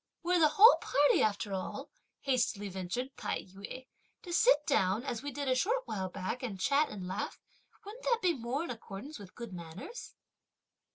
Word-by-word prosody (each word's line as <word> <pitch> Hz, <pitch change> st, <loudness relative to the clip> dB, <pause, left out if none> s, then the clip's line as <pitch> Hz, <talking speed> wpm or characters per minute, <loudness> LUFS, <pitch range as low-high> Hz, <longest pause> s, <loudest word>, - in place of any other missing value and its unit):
"Were 355 Hz, +1 st, +3 dB
the 315 Hz, -, +7 dB
whole 430 Hz, +10 st, +8 dB
party 290 Hz, +1 st, +3 dB
after 205 Hz, -1 st, 0 dB
all," 190 Hz, -1 st, -5 dB, 0.3 s
hastily 240 Hz, -6 st, 0 dB
ventured 190 Hz, +8 st, -4 dB
Tai -, -, -2 dB
yü, 200 Hz, +7 st, -9 dB, 0.4 s
"to 350 Hz, -, -6 dB
sit 445 Hz, -6 st, +5 dB
down, 210 Hz, -5 st, +2 dB
as 240 Hz, -5 st, -3 dB
we 285 Hz, -, -4 dB
did 285 Hz, +1 st, -4 dB
a 260 Hz, -, +4 dB
short 455 Hz, -, +1 dB
while 190 Hz, -, -3 dB
back 185 Hz, +7 st, -4 dB
and 215 Hz, -7 st, -4 dB
chat 280 Hz, +9 st, +3 dB
and 190 Hz, -4 st, -6 dB
laugh; 190 Hz, +3 st, -4 dB, 0.5 s
wouldn't 440 Hz, +5 st, -10 dB
that 475 Hz, -2 st, +3 dB
be 365 Hz, -6 st, +2 dB
more 255 Hz, +3 st, -2 dB
in 340 Hz, -, -4 dB
accordance 230 Hz, +5 st, -8 dB
with 195 Hz, -3 st, -12 dB
good 235 Hz, -5 st, -7 dB
manners?" 175 Hz, -, -8 dB
250 Hz, 180 wpm, -32 LUFS, 195-305 Hz, 0.5 s, whole